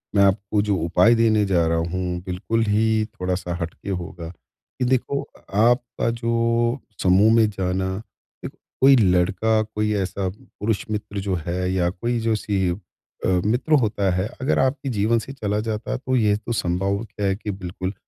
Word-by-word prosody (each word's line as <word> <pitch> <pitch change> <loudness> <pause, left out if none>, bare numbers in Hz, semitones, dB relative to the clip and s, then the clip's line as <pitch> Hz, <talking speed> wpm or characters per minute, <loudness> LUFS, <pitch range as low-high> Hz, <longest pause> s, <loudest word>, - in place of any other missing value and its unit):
मैं 100 - +6
आपको 100 +1 +2
जो 105 -1 +1
उपाय 90 +7 +4
देने 110 -2 +3
जा 90 -4 +2
रहा 85 - +1
हूँ, 90 +1 -2
बिल्कुल 95 +5 -1
ही 110 +1 +2
थोड़ा-सा 90 -5 -3
हटके 85 +4 -6
होगा, 85 -2 -5
कि 125 +7 -8
देखो 130 +2 0
अ, - - -16 0.2
आपका 120 +1 +2
जो 115 +1 0 0.2
समूह 95 +4 +5
में 110 -2 +4
जाना, 95 -1 -2 0.6
या - - -3 0.3
कोई 135 +1 +8
लड़का, 100 +1 +3
कोई 105 0 -2
ऐसा 95 -1 -1
पुरुष 105 +2 -4
मित्र 105 -1 -3
जो 95 -1 -1
है 90 +1 -1
या 90 -2 +1
कोई 115 +7 -2
जो 115 -1 +1
सी 100 -3 -1 0.6
अ, - - +2 0.2
मित्र 125 +8 +1
होता 105 -3 0
है, 95 +3 0
अगर 135 - +1
आपके 135 +1 0
जीवन 115 0 +2
से 135 - -8
चला 105 -5 -2
जाता 110 0 -3
है - - -1
तो 130 0 -2
ये 105 -4 +3
तो 110 +2 -7
संभव 100 +2 -1 0.2
है 95 -1 +2
कि 105 0 -5
बिल्कुल 95 0 -5
105 Hz, 175 wpm, -23 LUFS, 95-115 Hz, 0.6 s, कोई